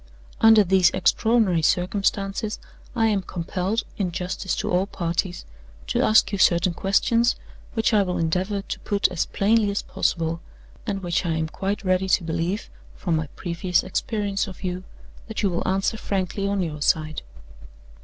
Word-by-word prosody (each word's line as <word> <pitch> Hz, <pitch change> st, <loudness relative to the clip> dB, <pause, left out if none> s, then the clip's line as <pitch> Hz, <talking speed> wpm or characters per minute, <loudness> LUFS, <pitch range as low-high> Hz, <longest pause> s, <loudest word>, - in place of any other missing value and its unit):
"Under 220 Hz, -1 st, +7 dB
these 185 Hz, -1 st, +4 dB
extraordinary 190 Hz, -1 st, +3 dB
circumstances, 195 Hz, +5 st, 0 dB, 0.4 s
I 225 Hz, -, +2 dB
am 210 Hz, -3 st, +2 dB
compelled, 185 Hz, +4 st, -2 dB, 0.2 s
in 185 Hz, -3 st, 0 dB
justice 180 Hz, +1 st, -3 dB
to -, -, -2 dB
all 185 Hz, +2 st, +2 dB
parties, 175 Hz, -1 st, -2 dB, 0.4 s
to -, -, 0 dB
ask 215 Hz, -2 st, +4 dB
you 200 Hz, -, -2 dB
certain 175 Hz, 0 st, +4 dB
questions 230 Hz, +6 st, +2 dB, 0.4 s
which 225 Hz, 0 st, +1 dB
I 210 Hz, -, +5 dB
will 180 Hz, -2 st, -1 dB
endeavor 185 Hz, +5 st, -1 dB
to -, -, -5 dB
put 200 Hz, -1 st, +1 dB
as 180 Hz, -3 st, -1 dB
plainly 210 Hz, +1 st, +2 dB
as 200 Hz, -, -2 dB
possible, 165 Hz, -1 st, -1 dB, 0.5 s
and 195 Hz, -1 st, -2 dB
which 175 Hz, 0 st, 0 dB
I 170 Hz, -2 st, 0 dB
am 160 Hz, 0 st, -1 dB
quite 195 Hz, +4 st, -3 dB
ready 185 Hz, 0 st, +1 dB
to 185 Hz, -, +3 dB
believe 170 Hz, +5 st, -2 dB, 0.3 s
(from 175 Hz, -4 st, -1 dB
my 155 Hz, -1 st, -1 dB
previous 175 Hz, 0 st, 0 dB
experience 205 Hz, 0 st, -2 dB
of 190 Hz, 0 st, -10 dB
you) 180 Hz, 0 st, -3 dB, 0.4 s
that 220 Hz, -1 st, -4 dB
you 195 Hz, -, +2 dB
will 170 Hz, -, -2 dB
answer 195 Hz, +3 st, 0 dB
frankly 195 Hz, -1 st, -2 dB
on 200 Hz, -1 st, 0 dB
your 150 Hz, -3 st, -5 dB
side. 155 Hz, +1 st, +1 dB
190 Hz, 165 wpm, -24 LUFS, 175-205 Hz, 0.5 s, Under